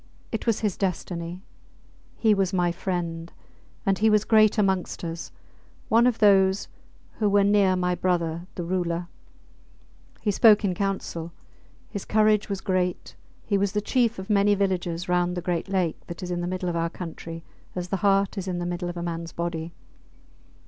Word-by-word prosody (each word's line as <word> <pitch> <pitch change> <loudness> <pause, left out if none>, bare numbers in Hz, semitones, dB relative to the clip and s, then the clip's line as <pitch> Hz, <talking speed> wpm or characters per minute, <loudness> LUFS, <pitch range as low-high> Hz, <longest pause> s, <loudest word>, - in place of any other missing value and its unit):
It 225 +1 -4
was 230 - +2
his 210 -4 -1
destiny. 180 -1 -3 0.7
He 220 -2 +4
was 195 -2 0
my 175 -2 +2
friend. 170 -2 -3 0.5
And 195 -1 +2
he 220 +1 +4
was 210 -1 +3
great 215 0 +5
amongst 190 -4 0
us 165 0 -5 0.6
one 230 +2 +5
of 245 -2 +1
those 195 -1 +4 0.5
who 210 -2 +3
were 200 0 +4
near 200 -2 +4
my 180 0 0
brother, 175 -1 -1
the 175 - -3
Ruler. 175 -1 -2 1.1
He 210 - 0
spoke 210 +1 +6
in 185 - +1
council, 175 -3 -3 0.5
his 200 -3 -6
courage 215 -1 +3
was 195 -1 -3
great, 180 -1 -1 0.3
he 200 -2 +1
was 200 0 0
the 210 - +1
chief 235 +1 +1
of 190 0 -6
many 205 -1 +4
villages 180 -3 -1
round 180 0 +1
the - - 0
great 175 +1 -2
lake 185 -5 -1
that 170 +2 -7
is 180 - -4
in 175 0 -1
the 175 - -2
middle 185 0 -3
of 175 - -1
our 165 0 0
country 165 -1 -7 0.3
as 180 -1 -4
the 195 - 0
heart 195 +1 +2
is 190 - -6
in 180 -1 -2
the 175 - -3
middle 175 0 -3
of 175 - -6
a 170 - -3
mans 165 -1 -4
body. 170 -1 -4
185 Hz, 180 wpm, -25 LUFS, 175-200 Hz, 1.1 s, spoke